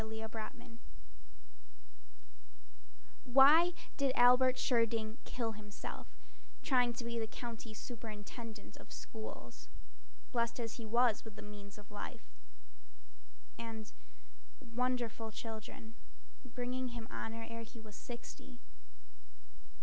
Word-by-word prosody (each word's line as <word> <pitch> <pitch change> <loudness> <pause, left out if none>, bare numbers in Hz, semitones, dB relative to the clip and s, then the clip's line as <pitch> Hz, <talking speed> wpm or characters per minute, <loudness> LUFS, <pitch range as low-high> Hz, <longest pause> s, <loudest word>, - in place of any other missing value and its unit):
Jonas 220 0 -4 0.3
Keene 230 0 -12 2.4
Why 285 +7 +9 0.3
did 275 -2 +4
Albert 250 +1 +8
Schirding 230 -3 +2
kill 230 -3 -1
himself 210 -1 -7 0.6
Trying 245 -2 +4
to 235 - -4
be 235 -1 0
County 230 -2 -6
Superintendent 220 - -7
of - - -14
Schools, 110 - -7 0.6
Blest 235 0 +1
as 230 0 -2
he 230 -2 -5
was 235 -1 +4
with 220 -2 -9
the - - -8
means 205 -1 -9
of 205 0 -13
life - - -6 1.3
And 225 -2 -5 0.8
wonderful 240 -2 0
children, 220 0 -6 0.5
bringing 255 0 -2
him 235 -2 -5
honor 225 0 -3
Ere 230 0 -5
he 230 +1 -10
was 215 -2 -11
sixty? 155 - -8
230 Hz, 105 wpm, -37 LUFS, 215-245 Hz, 2.4 s, Why